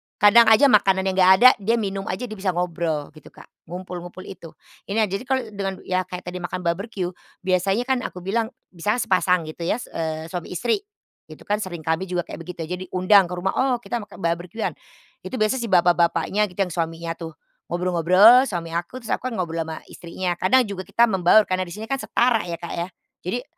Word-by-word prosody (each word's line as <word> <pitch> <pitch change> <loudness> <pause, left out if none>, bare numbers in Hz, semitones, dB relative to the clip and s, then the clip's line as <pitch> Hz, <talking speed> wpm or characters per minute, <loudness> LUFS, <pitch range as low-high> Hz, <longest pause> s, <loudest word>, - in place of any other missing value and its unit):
Kadang 225 +3 +6
aja 235 +5 +6
makanannya 190 -2 +3
nggak 185 0 +7
ada 255 - +12
dia 215 +4 +1
minum 195 -3 -3
aja 185 +7 -3
dia 215 -3 -6
bisa 190 -2 -1
ngobrol 170 -4 -2
gitu, 155 0 -16
Kak. - - -16 0.2
Ngumpul-ngumpul 180 +1 -8
itu. 170 -4 -11 0.3
Ini 220 +3 +1
ya - - +4
jadi 195 +5 -3
kalau 260 -1 +1
dengan 195 -2 -5
ya 185 0 -1
kayak 180 0 -7
tadi 180 +1 -6
makan 180 +1 -5
barbeque, 180 +1 -2 0.3
biasanya 190 +4 +1
kan 260 0 0
aku 180 -8 -7
bilang 220 +4 0 0.2
misalnya 210 +7 -1
sepasang 180 -2 +2
gitu 170 +1 -6
ya - - +2
s 245 - -9
eee, 160 0 -4
suami 175 -2 -5
istri, 235 - 0 0.5
itu - - -13
kan 210 +1 -1
sering, 175 -6 -6
kami 160 +4 -1
juga 180 -1 -2
kayak - - -9
begitu 170 0 -7
jadi 180 +3 -5
undang 185 +1 +5
ke 180 - -5
rumah. 185 +2 -1
Oh 260 -1 +2
kita 240 - -3
makan 205 -2 -11
barbeque-an, 175 +6 -2 0.6
itu - - -5
biasanya 235 +3 +1
si 235 - -3
bapak-bapaknya 175 +3 +2
gitu 180 0 -17
yang 180 - -6
suaminya 165 0 -3
tuh, 165 -2 -7 0.3
ngobrol-ngobrol 185 +8 +5
suami 170 -5 -4
aku, 175 +10 -4
terus 225 - -6
aku 255 - -1
kan 250 - -4
ngobrol 165 -3 -3
ama 160 -1 -7
istrinya. 175 0 -4
Kadang 255 +8 +4
juga 195 -4 -6
kita 235 - +3
membaur 195 -1 +5
karena 185 -2 -2
di 175 - -8
sini 215 - -7
kan 270 - 0
setara 235 -6 +1
ya, 170 - -3
Kak, 170 0 -7
ya. 170 +1 -3 0.4
Jadi, 240 +8 -3
185 Hz, 210 wpm, -23 LUFS, 175-215 Hz, 0.6 s, ada